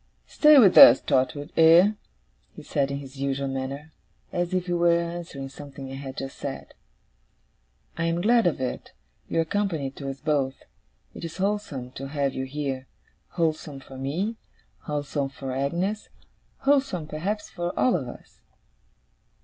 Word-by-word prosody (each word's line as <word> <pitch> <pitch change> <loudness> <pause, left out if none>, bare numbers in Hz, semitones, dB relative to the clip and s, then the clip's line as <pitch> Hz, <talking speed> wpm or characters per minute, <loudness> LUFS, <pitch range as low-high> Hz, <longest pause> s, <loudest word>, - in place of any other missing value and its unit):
'Stay 300 -1 +6
with 205 -8 +7
us, 120 - +11
Trotwood, 145 +3 0
eh?' 165 +5 +7 0.6
he - - -10
said 140 -3 0
in 140 - -3
his 140 -1 -10
usual 140 0 -1
manner, 135 +3 -5 0.4
and 175 - -1
as 175 0 -2
if 185 -1 0
he 175 - -2
were 170 0 +3
answering 170 -5 -5
something 135 -1 -10
I - - -7
had 135 -1 -7
just 135 0 -6
said. 135 -1 -6 1.3
'I 165 - +1
am 165 +1 0
glad 230 +1 +4
of 155 - 0
it. 130 -1 -4 0.4
You 165 - +1
are - - -1
company 165 -7 -1
to 140 0 -7
us 135 0 -6
both. 135 -3 -1 0.5
It - - -10
is 165 0 -6
wholesome 190 -11 -2
to 135 +1 -7
have 140 -1 -1
you 130 - -3
here. 135 -2 -4 0.5
Wholesome 155 -4 -1
for 135 - -13
me, 165 - -3 0.5
wholesome 145 -1 -2
for 135 -1 -7
Agnes, 170 +11 -2 0.5
wholesome 270 - +1
perhaps 185 +8 -4
for 175 -1 -3
all 255 - +3
of 140 -8 -2
us. - - -13
150 Hz, 160 wpm, -25 LUFS, 135-175 Hz, 1.3 s, us